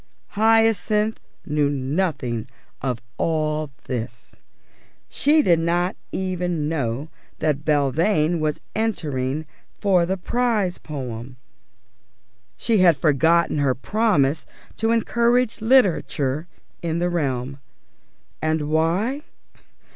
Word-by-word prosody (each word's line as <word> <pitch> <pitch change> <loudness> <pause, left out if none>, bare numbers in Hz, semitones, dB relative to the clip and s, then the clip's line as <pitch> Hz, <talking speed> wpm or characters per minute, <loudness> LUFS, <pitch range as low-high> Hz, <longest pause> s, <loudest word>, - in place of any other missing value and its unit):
Hyacinth 220 -1 +2 0.3
knew 150 -1 +1
nothing 135 - -2 0.3
of 125 -4 -2 0.2
all 155 -2 0
this. 120 -2 -6 0.7
She 300 +2 +3
did 170 -7 +4
not 175 +3 0 0.2
even 180 -4 -2
know 140 -2 -2 0.3
that 150 -2 0
Belvane 155 +4 +2
was 155 -1 -1 0.2
entering 155 - -1 0.3
for 185 -4 +2
the 190 +1 -1
prize 215 -2 0
poem. 125 -4 -7 1.2
She 225 -3 +1
had 175 -5 +5
forgotten 160 +2 +3
her 135 -3 +2
promise 160 - +1 0.3
to 225 - 0
encourage 235 +1 +2
literature 175 - +2 0.3
in 165 -1 -1
the 175 +1 +1
realm. 135 -4 -2 0.8
And 155 -1 -1
why? 180 - +1
160 Hz, 95 wpm, -23 LUFS, 140-200 Hz, 1.2 s, had